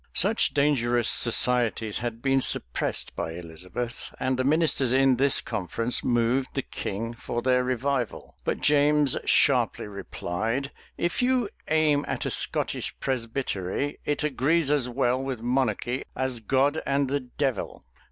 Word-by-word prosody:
Such 205 +1 +1
dangerous 120 -5 +2
societies 120 -3 +2
had 120 0 -5
been 135 -1 +3
suppressed - - -1
by 80 - -3
Elizabeth; 90 +8 -6
and 130 0 0
the 130 - 0
ministers 145 -3 +2
in 135 -1 +4
this 140 +1 +3
conference 115 +7 -1
moved 120 +2 +1
the 135 - -1
king 115 +4 -5
for 120 0 -4
their 125 -1 +3
revival. 130 -1 -2
But - - -2
James 145 -1 +4
sharply - - +3
replied, 110 +5 -3 0.3
"If 170 - -1
you 250 -3 +2 0.2
aim 155 -2 +2
at - - -3
a - - -1
Scottish - - 0
presbytery, 125 -1 -2
it 145 +1 -1
agrees 150 +2 +2
as 140 -4 +2
well 125 0 +1
with 130 -4 -4
monarchy 125 0 0
as 130 -2 -2
God 135 +7 +1
and 140 0 +1
the 140 +2 0
devil. 130 0 -3
130 Hz, 140 wpm, -26 LUFS, 120-140 Hz, 0.3 s, in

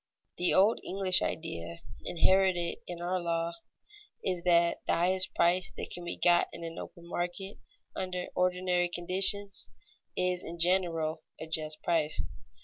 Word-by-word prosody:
The 180 - +2
old 205 +4 +5
English 190 -1 +2
idea, 85 - -3 0.3
inherited 180 -1 +2
in 175 -1 -6
our 180 +1 0
law, 170 0 -1 0.7
is 180 -2 -1
that 170 -1 +4
the - - +3
highest 185 +2 +1
price 180 +2 +3
that - - -5
can 175 - -5
be 175 - -4
got 175 -1 +4
in 170 - -8
an 165 0 -6
open 170 -2 -10
market, 180 +3 -4 0.4
under 180 -1 -3
ordinary 180 -1 +1
conditions, 190 - 0 0.5
is 180 -1 +1
in 170 - -7
general 165 -3 +3 0.2
a - - -5
just 155 -1 -3
price. 160 -3 +1
175 Hz, 140 wpm, -30 LUFS, 170-185 Hz, 0.7 s, old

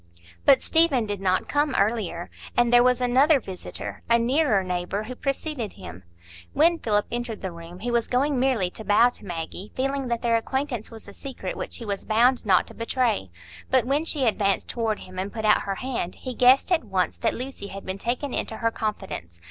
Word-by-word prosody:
But 270 - +6
Stephen 320 -8 +3
did 205 -2 -4
not 185 -1 +1
come 290 -1 +1
earlier, 200 -5 0 0.3
and 240 0 +3
there 240 - +8
was 250 0 +3
another 270 +5 +4
visitor—a 210 +3 -3
nearer 240 -3 +2
neighbour—who 185 +6 -3
preceded 275 -3 -3
him. 90 +2 -10 0.5
When 335 +2 +4
Philip 210 -2 +1
entered 240 -3 -4
the 190 - -3
room, 170 +2 -11
he 240 +2 -2
was 235 -1 +1
going 270 +2 +1
merely 245 -9 +1
to 220 - -7
bow 210 +4 +5
to 245 - -9
Maggie, 175 +3 -6
feeling 270 0 -1
that 235 0 -2
their 230 -1 +3
acquaintance 260 -1 -2
was 225 -2 -9
a 200 - -10
secret 255 -9 -6
which - - -4
he 235 - -8
was 200 -2 -3
bound 240 +2 +3
not 185 -2 +5
to - - -12
betray; 230 - 0 0.4
but 260 -2 +3
when 280 +4 +1
she 300 -5 +1
advanced 200 -3 +1
toward 225 -3 -2
him 185 0 -8
and 195 +2 -3
put 220 -2 -4
out 210 - +5
her 195 - -1
hand, 240 -7 -3
he 255 - -6
guessed 255 +8 +5
at 340 -6 +3
once 190 -4 -1
that 230 - 0
Lucy 255 -5 -6
had 195 0 -9
been 190 +1 -4
taken 250 +5 -2
into 220 - -3
her 230 0 0
confidence. 195 - -5
230 Hz, 200 wpm, -25 LUFS, 195-255 Hz, 0.5 s, there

